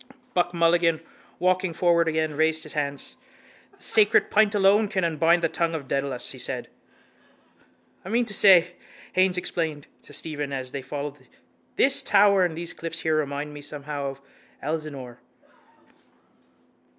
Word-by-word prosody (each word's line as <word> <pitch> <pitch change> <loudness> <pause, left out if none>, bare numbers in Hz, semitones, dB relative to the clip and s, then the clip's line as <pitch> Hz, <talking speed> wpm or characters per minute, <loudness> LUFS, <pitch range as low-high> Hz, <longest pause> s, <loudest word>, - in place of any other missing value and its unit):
Buck 175 -1 +1
Mulligan, 170 -1 +2 0.4
walking 185 -1 +1
forward 170 0 +2
again, 155 -1 0
raised 160 +1 +1
his 155 - -9
hands. 150 - -3 0.6
—The - - -7
sacred 210 -2 +4
pint 215 0 +3
alone 205 +2 +4
can 195 -3 -2
unbind 165 +1 +2
the - - +4
tongue 165 0 -1
of 140 -4 -6
Dedalus, 135 -2 -2
he - - -9
said. - - -3 1.3
—I 190 - -8
mean 235 +3 +1
to 215 - -3
say, 180 -3 +5 0.4
Haines 185 -1 +2
explained 160 -5 -3 0.2
to - - -13
Stephen 145 -3 -4
as 130 -2 -4
they 140 - -5
followed, 145 +2 -7 0.5
this 270 +1 +3
tower 200 -2 +4
and 165 -3 -1
these 170 0 -4
cliffs 165 0 -6
here 160 -1 +1
remind 145 0 -2
me 145 - -9
somehow 145 -1 -5
of 135 0 -7 0.4
Elsinore. 140 -5 -5
165 Hz, 150 wpm, -25 LUFS, 145-180 Hz, 1.3 s, say